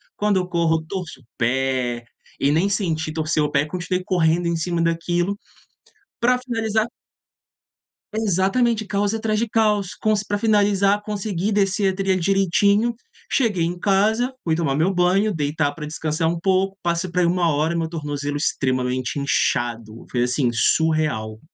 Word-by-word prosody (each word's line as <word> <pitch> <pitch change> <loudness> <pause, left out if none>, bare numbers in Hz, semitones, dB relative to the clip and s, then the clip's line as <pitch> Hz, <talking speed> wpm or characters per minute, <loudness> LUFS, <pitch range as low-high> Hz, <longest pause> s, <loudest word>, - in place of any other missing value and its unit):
Quando 205 -2 +1
eu 180 -1 -1
corro 165 -2 +1
torço 180 -7 -6
o - - -23
pé 125 -1 0 0.3
e 140 - +2
nem 175 +6 +2
senti 165 -6 -1
torcer 155 -1 0
o 150 - -1
pé, 145 +1 +2
continuei 180 +3 -3
correndo 170 -1 +1
em 170 - 0
cima 170 +1 -1
daquilo 175 +3 0 0.8
para 250 +1 +4
finalizar 225 -3 -1 1.3
Exatamente, 220 +2 +1
caos 205 +1 0
atrás 220 -1 -1
de 230 +1 0
caos. 210 -3 +1
Com 215 0 +1
se 205 0 -3
para 205 - -1
finalizar, 205 -2 +3
consegui 205 -1 -2
descer 195 -1 +1
a - - -9
trilha 195 -1 +1
direitinho, 200 +5 +2 0.4
cheguei 210 -10 +1
em 175 +1 -2
casa, 215 +7 +1
fui 160 -2 +1
tomar 150 -5 0
meu 165 +6 +2
banho, 185 +4 +2
deitar 145 -1 0
para 150 -2 -6
descansar 155 +1 -2
um 170 0 -1
pouco, 190 +1 +1
passa 170 +1 -1
por 180 +1 -1
aí 175 - +4
1h 170 -3 +2
hora 155 +3 +1
e - - -1
meu 165 -1 -1
tornozelo 145 -3 -4
extremamente 130 -1 -1
inchado, 120 -5 -1
foi 120 -1 +1
assim, 125 0 +1
surreal. 120 -5 +1
175 Hz, 160 wpm, -22 LUFS, 155-200 Hz, 1.3 s, para